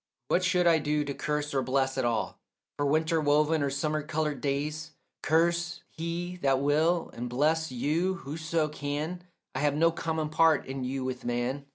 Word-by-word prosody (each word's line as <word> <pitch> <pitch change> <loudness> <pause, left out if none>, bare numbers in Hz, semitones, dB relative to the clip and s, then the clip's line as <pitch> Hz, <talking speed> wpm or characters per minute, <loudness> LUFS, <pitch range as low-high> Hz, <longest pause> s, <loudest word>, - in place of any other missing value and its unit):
What 180 - +3
should 180 -1 +2
I 165 -2 +5
do 150 0 0
to 140 - -3
curse 150 +1 -2
or 135 - +2
bless 135 0 0
at 130 -2 0
all 115 -2 -1 0.4
For 145 - 0
winter 160 +2 +2
woven 150 +1 +3
or 140 - +1
summer 150 +3 -1
coloured 150 -1 -2
days? 150 +2 -2 0.3
Curse 170 +2 +1
he 170 +2 -4
that 135 -5 +2
will 155 +5 +2
and 120 +1 -5
bless 155 +5 +1
you 160 +9 0
whoso 160 0 -2
can, 150 +4 -4 0.3
I 130 - -2
have 145 0 +2
no 165 +2 +4
common 160 -2 -2
part 160 0 +4
in 135 0 -4
you 130 +1 -2
with 130 -1 -4
man. 120 +4 -2
150 Hz, 180 wpm, -29 LUFS, 140-160 Hz, 0.4 s, I